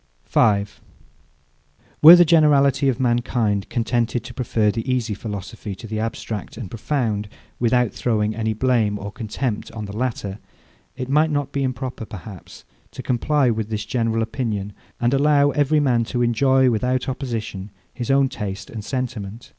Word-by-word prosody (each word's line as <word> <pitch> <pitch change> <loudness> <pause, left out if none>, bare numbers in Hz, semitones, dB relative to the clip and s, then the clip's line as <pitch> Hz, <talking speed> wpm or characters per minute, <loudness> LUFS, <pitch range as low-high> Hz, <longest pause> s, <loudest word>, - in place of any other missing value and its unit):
5. 100 -2 +1 1.2
Were 165 +3 +12
the 175 0 +6
generality 145 -4 +4
of 130 - -1
mankind 120 -5 0
contented 120 0 -1
to 125 0 -9
prefer 115 -4 +1
the 115 +4 -3
easy 120 -4 0
philosophy 100 -1 -6
to 115 - -11
the 110 -1 -4
abstract 110 -2 -5
and 110 -8 -7
profound, 110 -4 -2 0.3
without 125 -1 +2
throwing 110 -3 0
any 110 0 -1
blame 110 -3 +1
or 100 +1 -6
contempt 110 +1 -4
on 110 -2 -5
the 100 0 -8
latter, 110 -4 -3 0.6
it 130 -1 -5
might 150 +4 +3
not 145 -2 -1
be 140 - -2
improper, 130 -2 -3
perhaps, 95 -2 -11 0.2
to - - -9
comply 130 +1 +1
with 110 -1 -3
this 105 -1 -3
general 115 -1 0
opinion, 110 -4 -3 0.3
and 120 +2 +1
allow 145 0 +4
every 145 +1 +2
man 125 -5 +2
to 120 +1 -1
enjoy, 130 +3 +3
without 125 +4 0
opposition, 115 -7 -4 0.2
his 125 +1 -5
own 135 0 +4
taste 100 -5 -6
and 110 -2 -6
sentiment. 120 -3 -5
120 Hz, 155 wpm, -22 LUFS, 105-130 Hz, 1.2 s, Were